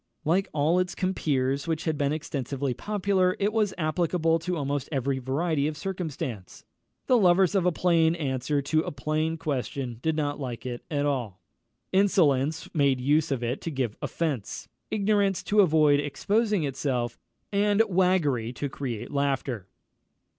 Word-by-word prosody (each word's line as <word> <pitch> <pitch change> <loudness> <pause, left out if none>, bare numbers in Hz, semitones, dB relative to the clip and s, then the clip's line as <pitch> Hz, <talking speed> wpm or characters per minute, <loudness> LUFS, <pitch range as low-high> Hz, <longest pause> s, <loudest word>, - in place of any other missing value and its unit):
Like 185 +5 +2
all 155 +4 +2
its 180 -1 -1
compeers 140 -7 0
which 160 -1 -1
had 160 -2 0
been 145 -1 0
extensively 140 -3 -3
popular, 195 0 +1
it 205 +2 0
was 215 -3 +2
applicable 165 0 +1
to 175 +2 -2
almost 140 -2 -2
every 135 -1 0
variety 140 +3 0
of 155 -1 -4
circumstance. 145 - -5 0.4
The 250 -2 +4
lovers 180 -2 +4
of 190 -3 +2
a - - +4
plain 165 -1 +3
answer 140 -2 -1
to 155 +3 +1
a - - -4
plain 155 +3 -1
question 135 -5 -3
did 160 +2 0
not 145 -2 -1
like 125 -3 -5
it 120 -1 -5
at 145 -2 0
all. 120 -10 -2 0.5
Insolence 160 -7 +2
made 140 -4 +2
use 150 +5 +2
of 135 -4 -1
it 120 +3 -2
to - - -3
give 130 -7 -2
offence; 145 -11 -3 0.2
ignorance 200 -2 +1
to 210 - +1
avoid 155 -5 +4
exposing 205 +7 0
itself; 130 -3 -2 0.3
and 205 +1 +3
waggery 175 - +2
to 145 - -3
create 125 -5 -5
laughter. 135 -7 -1
155 Hz, 155 wpm, -27 LUFS, 135-180 Hz, 0.5 s, The